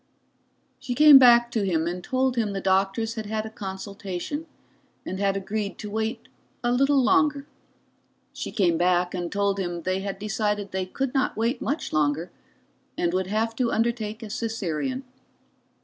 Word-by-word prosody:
She 245 - -4
came 295 -1 +9
back 240 -2 +6
to 220 -3 0
him 165 -4 0
and 175 +1 -4
told 260 +2 0
him 220 -4 0
the 195 - -2
doctors 195 +4 +1
had 220 -2 -5
had 215 0 -2
a 220 - -7
consultation, 200 - -6 0.6
and 190 - -4
had 195 -1 +1
agreed 200 +1 -3
to 210 -1 -7
wait 220 +2 -3 0.4
a 240 - +2
little 275 +2 +3
longer. 285 +2 +2 0.9
She - - -5
came 170 -5 +2
back 180 0 +2
and 175 -2 -3
told 200 -1 0
him 175 -2 -3
they 185 +2 0
had 195 0 -4
decided 210 -1 -2
they 185 -1 -2
could 265 +6 -3
not 265 -5 0
wait 235 +3 0
much 300 +3 -3
longer, 155 +3 0 0.7
and 175 0 0
would 185 0 0
have 220 +3 -1
to 245 -2 +1
undertake 225 -1 -1
a 215 - -7
Caesarean. 225 - -3
210 Hz, 165 wpm, -25 LUFS, 190-235 Hz, 0.9 s, came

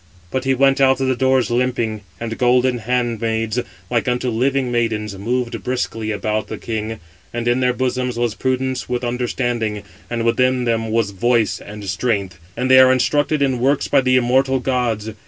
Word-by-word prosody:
But 130 0 -2
he 135 0 +2
went 135 +1 +3
out 135 0 +4
of 135 - 0
the 130 - +1
doors 130 -1 +2
limping, 120 -3 0 0.2
and 115 -1 -4
golden 125 0 +3
handmaids, 115 -1 -1 0.3
like 120 +4 -1
unto 125 0 0
living 130 +2 0
maidens, 110 -4 -1
moved 120 +4 -2
briskly 120 -3 -2
about 110 0 -2
the - - -6
king; 110 -1 -4 0.3
and 120 0 -3
in 120 +1 +2
their 125 -1 +2
bosoms 125 -1 -2
was 120 -2 0
prudence 130 +1 -2
with 125 0 -2
understanding, 120 -3 -2 0.3
and 115 -1 -2
within 125 +2 +2
them 115 -2 0
was 110 -2 0
voice 115 +3 +1
and 105 0 -9
strength; 95 -2 -2 0.2
and 130 +2 0
they 130 - +8
are 130 0 +7
instructed 145 +3 +1
in 130 -3 0
works 135 +3 +1
by - - +3
the 130 0 +2
immortal 130 +2 +2
gods. 120 -4 -1
120 Hz, 175 wpm, -19 LUFS, 115-130 Hz, 0.3 s, they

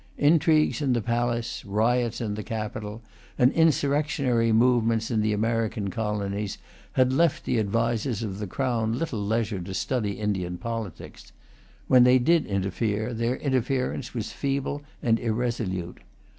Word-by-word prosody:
Intrigues 155 0 +3
in 135 -3 +2
the 120 - +1
palace, 120 0 -1
riots 115 +4 0
in 110 -3 -2
the 105 - -4
capital, 110 0 -5 0.3
and 125 +2 +5
insurrectionary 140 -6 +2
movements 115 -1 +3
in 110 -2 +2
the 105 0 +1
American 110 -1 -1
colonies, 105 -2 -2 0.4
had 130 0 +3
left 165 +2 +2
the 120 - +1
advisers 115 +2 0
of 100 -2 -4
the 105 - -4
Crown 115 -1 -1
little 125 -9 -2
leisure 110 -1 -1
to 95 +2 -6
study 110 -4 -1
Indian 95 -4 -2
politics. 115 -3 -6 0.6
When 125 -1 +7
they 125 +1 +6
did 165 +6 +3
interfere, 105 +3 -1
their 115 +2 0
interference 130 -1 -1
was 110 -3 -3
feeble 140 +1 -2 0.2
and 115 -1 +3
irresolute. 110 -6 -2
115 Hz, 140 wpm, -26 LUFS, 105-125 Hz, 0.6 s, When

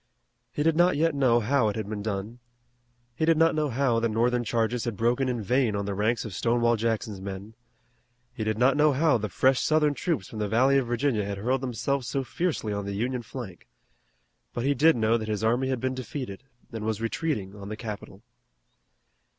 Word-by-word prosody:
He 150 - -1
did 165 0 +3
not 175 -1 +4
yet 165 +1 +2
know 130 -4 +3
how 120 0 +2
it 105 - -4
had 110 -3 -4
been 105 -1 -4
done. 105 +3 -4 0.7
He 160 - -3
did 165 0 +4
not 165 +1 +4
know 155 -1 0
how 125 -2 +1
the 115 0 0
Northern 120 +2 +1
charges 115 +1 -1
had 115 -4 -3
broken 120 +4 +1
in 120 -3 -2
vain 125 0 +1
on 100 0 -2
the 100 - -2
ranks 110 +5 0
of 110 - -6
Stonewall 120 +3 +2
Jackson's 110 -3 -2
men. 100 +2 -7 0.8
He 115 - -4
did 110 0 -1
not 130 +3 +4
know 150 0 +4
how 145 -2 +3
the 105 0 -3
fresh 130 +7 +2
Southern 155 -1 +2
troops 145 - -2
from 110 - -8
the 105 -1 -1
Valley 130 +5 +4
of 130 - -3
Virginia 120 -2 0
had 100 0 -4
hurled 125 +6 0
themselves 130 +1 -2
so 135 +3 -1
fiercely 140 -7 -2
on 100 -1 -3
the 100 0 -4
Union 125 +4 -1
flank. 115 -6 -9 0.9
But 120 - -3
he 140 - +3
did 155 +4 +4
know 115 0 +2
that 110 - -5
his 110 0 -2
army 120 +4 +1
had 130 -2 -1
been 130 +2 -1
defeated 130 -2 -6 0.3
and 115 -2 -5
was 110 -1 -1
retreating 115 -4 -2
on 100 -1 -9
the 110 - -5
capital. 110 -3 -8
120 Hz, 210 wpm, -27 LUFS, 110-135 Hz, 0.9 s, not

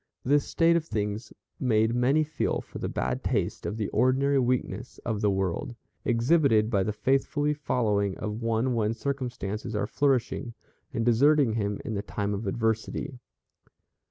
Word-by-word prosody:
This 145 +2 +3
state 165 0 +3
of 170 - +2
things 105 -5 -3 0.3
made 110 -2 +2
many 130 +6 +3
feel 155 -2 -1
for - - -9
the - - -3
bad - - -2
taste - - -1
of 105 - -3
the 105 -3 -1
ordinary 135 +2 +3
weakness 125 0 -1
of 110 -3 -1
the 105 - +3
world, 95 +4 -1 0.3
exhibited 120 -2 +3
by 100 -4 +2
the 105 - 0
faithfully 135 +6 +1
following 105 -9 0
of 105 +2 -4
one 115 +2 +1
when 110 -1 0
circumstances 120 -5 -4
are 105 - 0
flourishing, 125 -1 0 0.4
and 115 - -1
deserting 135 +1 +4
him 105 -2 -1
in 110 - -3
the 100 - -1
time 100 0 -3
of 100 +1 -4
adversity. 110 +4 -2
115 Hz, 155 wpm, -27 LUFS, 105-135 Hz, 0.4 s, deserting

